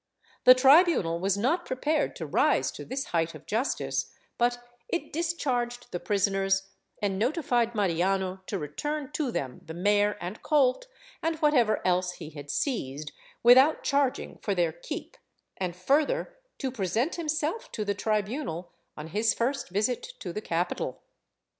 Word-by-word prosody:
The 255 - +10
tribunal 265 - +5
was 195 +2 +1
not 310 - +1
prepared 295 +3 0
to - - -5
rise - - +2
to - - -8
this 270 +1 -3
height 165 -1 +1
of - - -12
justice, 230 +6 -1 0.3
but 240 0 +2 0.3
it 345 - -3
discharged 250 -8 -2
the 175 - -3
prisoners 195 -1 +1 0.3
and 195 -2 0
notified 240 -2 +1
Mariano 190 0 0
to 200 - -2
return 290 - -4
to 300 -4 -1
them 130 - -4
the 160 - -8
mare 205 +3 +2
and 180 +5 -6
colt 295 - +2 0.3
and 325 0 0
whatever 295 -8 +2
else 180 0 +2
he 160 -3 -9
had 145 -1 -10
seized, 150 - -2 0.3
without 260 +6 +7
charging 280 -2 0
for 200 - -1
their 170 -3 +2
keep, 170 - -7 0.4
and 180 -2 -3
further 300 - +1 0.2
to 265 -2 -2
present 225 - 0
himself 315 +5 -2
to 215 - -3
the 205 - +1
tribunal 210 - -2 0.3
on 155 +1 -7
his 215 +6 +2
first 260 +4 -1
visit 215 +6 0 0.2
to 175 - -6
the 210 - -4
capital. 175 -1 -2
220 Hz, 150 wpm, -28 LUFS, 185-280 Hz, 0.4 s, The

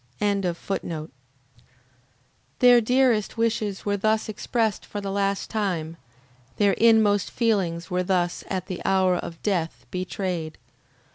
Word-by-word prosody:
] - - -38 2.5
Their 245 -1 +6
dearest 245 -3 +2
wishes 220 -3 -1
were 205 0 0
thus 215 +2 +1
expressed 220 0 -1
for 205 - -6
the 200 -1 -4
last 200 0 -1
time, 175 -7 -2 0.6
their 205 -1 +4
inmost 220 -3 +4
feelings 180 -8 0
were 180 0 +1
thus 180 -1 0
at 185 -2 -3
the 185 -3 -6
hour 190 -1 +3
of 165 -1 -6
death 175 -6 -1
betrayed. 180 -3 -3
200 Hz, 120 wpm, -25 LUFS, 180-220 Hz, 2.5 s, Their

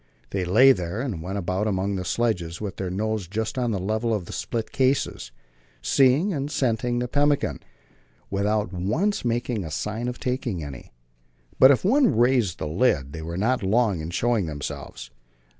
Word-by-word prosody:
They 95 -2 -1
lay 120 +10 +7
there 90 -2 -2
and 115 -10 -3
went 95 +4 -4
about 95 +2 -1
among 100 0 0
the 95 - -3
sledges 90 -6 -1
with 100 -3 -5
their 95 -2 -3
noses 105 0 -2
just 110 +4 -3
on 120 -2 0
a 105 - -1
level 110 +5 -1
with 90 - -8
the - - -8
split 115 -2 -3
cases, 130 - 0 0.5
seeing 135 - +3
and 140 -1 -2
scenting 120 -3 0
the 125 0 -1
pemmican, 145 +2 +1 0.7
without 100 -1 0
once 155 - 0
making 120 -2 -1
a 80 - -6
sign 105 +9 -3
of 125 0 -4
taking 125 - -2
any. 70 -4 -9 0.7
But 130 - +9
if 140 +4 +3
one 255 - +4
raised 120 -6 +2
a - - -1
lid, 75 - +1
they 80 - -6
were 85 +2 -5
not 125 +6 +1
long 105 -1 +2
in 80 - -5
showing 110 +1 0
themselves. 70 -4 -6
110 Hz, 175 wpm, -25 LUFS, 90-125 Hz, 0.7 s, But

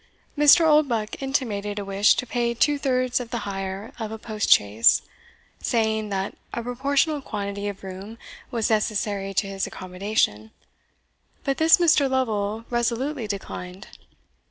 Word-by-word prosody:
Mr. 295 +3 +7
Oldbuck 275 -9 +2
intimated 210 -7 -2
a 205 - -3
wish 195 +2 +3
to - - -2
pay 235 -1 -1
two 290 +4 +2
thirds 255 -2 +1
of 245 -2 -6
the 235 - -4
hire 195 +1 -5
of 220 -1 -4
a 220 - -5
post 215 -1 -3
chaise, 105 +3 +5 0.6
saying, 220 -2 0
that 195 -1 -3 0.2
a 235 - -3
proportional 280 +5 0
quantity 200 -3 -4
of 200 -1 -6
room 195 +4 -8 0.3
was 230 -3 -1
necessary 205 -2 0
to 195 +1 0
his 195 -1 -3
accommodation; 180 - -2 0.9
but 275 -1 -1
this 320 +1 +6
Mr. 305 -5 +4
Lovel 220 -4 -1
resolutely 240 +2 -1
declined. 190 -2 -7
220 Hz, 140 wpm, -24 LUFS, 200-255 Hz, 0.9 s, Mr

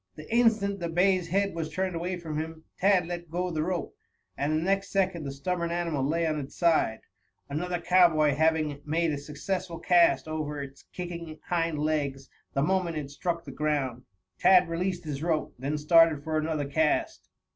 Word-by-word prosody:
The 155 - -10
instant 215 -4 +3
the 170 -1 -3
bay's 180 +1 +2
head 200 +3 +1
was 165 -1 -3
turned 185 +2 -2
away 180 +2 -2
from 160 -3 -4
him 160 0 -6 0.2
Tad 190 -2 +4
let 175 -1 -6
go 180 +2 -2
the 155 -2 -1
rope, 175 +2 -3 0.4
and 145 +2 -1
the 155 +1 +1
next 195 +1 0
second 185 -5 0
the 140 - -3
stubborn 170 +5 -2
animal 170 -5 -1
lay 165 +4 +1
on 155 -1 0
its 135 -1 -8
side, 165 -10 +2 0.5
another 175 +4 -2
cowboy 170 -4 +4
having 155 -1 +1
made 160 +2 0
a - - -2
successful 170 +5 -4
cast 175 -2 +4
over 155 -2 -3
its 140 0 -9
kicking 170 -3 -6
hind 165 -3 0
legs 145 -3 -2 0.2
the 140 - +1
moment 180 -1 0
it 140 -2 -5
struck 170 +3 -3
the - - -7
ground. 145 -5 -1 0.4
Tad 185 -2 +6
released 180 +2 -2
his 150 -3 -5
rope, 160 -2 -1
then 140 +4 -2
started 155 -1 +5
for 160 0 -2
another 155 -2 -1
cast. 150 +2 0
165 Hz, 180 wpm, -28 LUFS, 150-180 Hz, 0.5 s, Tad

